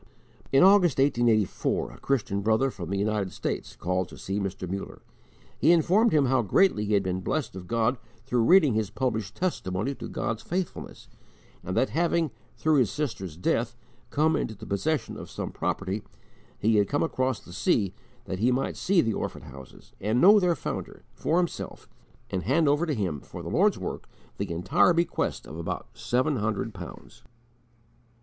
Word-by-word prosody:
In 135 - +6
August, 190 -6 +6
1884, 120 -7 +1
a - - -14
Christian 105 -7 0
brother 110 +6 +2
from 85 -6 -7
the 100 - -1
United 100 -2 0
States - - -4
called 90 0 -1
to - - -12
see 100 +2 -3
Mr. 95 -2 -4
Muller. 95 +2 -6 0.6
He 165 - +5
informed 190 +7 +4
him 150 -3 +4
how 130 -1 +3
greatly 105 - +3
he 105 0 +2
had 100 - +2
been 95 0 -2
blessed 130 - -2
of 90 -2 -8
God 115 +2 +1 0.3
through 125 0 +1
reading 170 - +6
his 110 -2 0
published 110 -4 -2
testimony 125 - -2
to - - -7
God's 115 -1 -3
faithfulness; 180 0 -5 0.6
and 90 - -3
that 130 - +2
having, 165 -2 +1 0.3
through 155 +5 +3
his 125 -4 +3
sister's 110 - -4
death, 120 +6 0 0.3
come 155 +2 +2
into 110 - -2
the - - -10
possession 150 +10 -1
of - - -9
some - - -5
property, 100 +2 -2 0.6
he 110 0 +2
had 105 - +3
come 145 - +1
across 130 -7 0
the 90 - -13
sea, 95 0 +1 0.3
that 95 - -4
he 120 +4 +3
might 130 +2 -1
see 190 -2 +3
the 115 - 0
orphan - - -4
houses 65 -1 -13
and 110 +4 +1
know 205 +6 +8
their 180 -3 +2
founder, - - -6
for 165 - 0
himself, 175 -1 -3 0.4
and 95 - -1
hand 140 - +2
over 145 +4 +2
to 150 - 0
him 90 - -2
for - - -9
the - - -5
Lord's - - +3
work - - -6 0.3
the - - -2
entire 140 - +3
bequest 170 +1 -1
of 80 +3 -8
about 85 - -4
seven 130 +4 0
hundred 110 0 -2
pounds. 90 -3 -10
115 Hz, 180 wpm, -27 LUFS, 100-155 Hz, 0.6 s, know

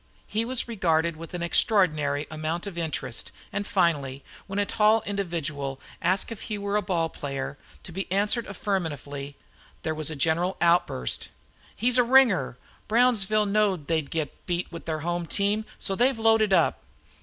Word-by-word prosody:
He 220 +2 -1
was 255 +1 -1
regarded 170 -7 +1
with 165 +2 -8
an 175 - -3
extraordinary 155 -6 +2
amount 155 +3 -3
of 200 -3 -6
interest; 160 -8 -3 0.2
and 205 0 -2
finally, 145 -9 +1 0.2
when 195 0 -4
a 205 - +2
tall 215 +1 +3
individual 155 -9 -3 0.2
asked 190 +5 +1
him - - -1
if - - -14
he 215 - -3
were 200 0 -2
a 210 - +3
ball 170 -5 0
player, 140 -3 -5 0.3
to - - -8
be 190 +1 -5
answered 205 +4 +1
affirmatively, 150 -8 -3 0.5
there 160 - -1
was 155 -1 0
a 155 - -4
general 165 +5 +1
outburst. 170 - +1 0.5
"He's 245 +3 +3
a - - +7
ringer! 235 - +4 0.3
Brownsville 215 -3 +3
knowed 200 -6 +1
they 160 +1 +1
'd 140 - -14
git 155 -4 -4
beat 175 -1 -1
with 170 -1 -8
their 155 -2 -2
home 175 +1 -2
team, 205 +4 +1
so 195 - -2
they've 245 +5 +3
loaded 225 -2 +4
up!" 190 - +3
180 Hz, 170 wpm, -26 LUFS, 155-210 Hz, 0.5 s, a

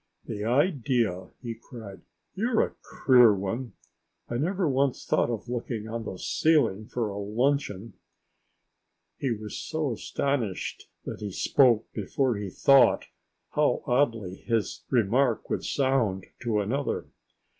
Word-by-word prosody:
"The 105 -2 -5
idea!" 120 - +1
he 120 -1 -3
cried. 110 -4 -11 0.3
"You're 225 +4 +2
a - - -11 0.3
queer 125 -4 +8
one! 115 +6 -4 0.5
I 120 - -2
never 180 +6 0
once 135 -1 0
thought - - +2
of 115 0 -4
looking 120 -2 -4
on 115 0 -4
the 95 - -5
ceiling 115 - +2
for 115 -3 -2
a 100 0 -5
luncheon!" 110 -1 -1 1.3
He 135 - -1
was 105 -2 -4
so 155 -4 -2
astonished 120 -2 -2 0.2
that - - -5
he 105 -1 -5
spoke 120 +2 +3
before 120 +4 0
he 100 -1 -4
thought 135 +5 +4 0.4
how - - +1
oddly 115 -8 +1
his 115 -3 -2
remark 120 +1 +2
would - - -1
sound 130 -9 +1
to 110 -3 0
another. 135 +8 -2
120 Hz, 130 wpm, -27 LUFS, 105-135 Hz, 1.3 s, queer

